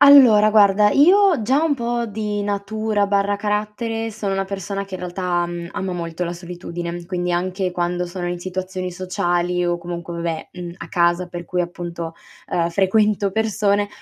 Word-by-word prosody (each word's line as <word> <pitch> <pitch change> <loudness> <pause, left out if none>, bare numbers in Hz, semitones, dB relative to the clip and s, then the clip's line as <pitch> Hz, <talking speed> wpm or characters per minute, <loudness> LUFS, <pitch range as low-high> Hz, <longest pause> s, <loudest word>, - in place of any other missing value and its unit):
Allora, 250 -7 +8
guarda 210 -1 +5
io 360 - +5
già 270 +8 +2
un 310 -3 +2
po' 235 -1 -1
di 210 -1 -3
natura/carattere 210 +2 -1
sono 205 -2 -3
una 195 0 0
persona 195 +1 -4
che 195 - -9
in 185 - -5
realtà, 180 -1 -1
mhmm, 175 0 -6
ama 190 -1 -3
molto 170 -1 -4
la 170 -1 -2
solitudine, 175 0 -6
quindi 180 0 -2
anche 185 +1 -1
quando 175 0 -1
sono 175 0 -4
in 175 - -3
situazioni 185 0 -4
sociali 180 -1 0
o 175 0 +1
comunque 170 0 -6
vabbè, 170 -1 -3
mhmm, 175 -1 -7
a - - -9
casa 175 0 +2
per 175 -1 -7
cui 180 +2 -1
appunto, 170 -1 -5 0.3
ehm, 170 -1 0
frequento 200 +2 +2
persone, 205 -1 +1
185 Hz, 165 wpm, -21 LUFS, 175-210 Hz, 0.3 s, Allora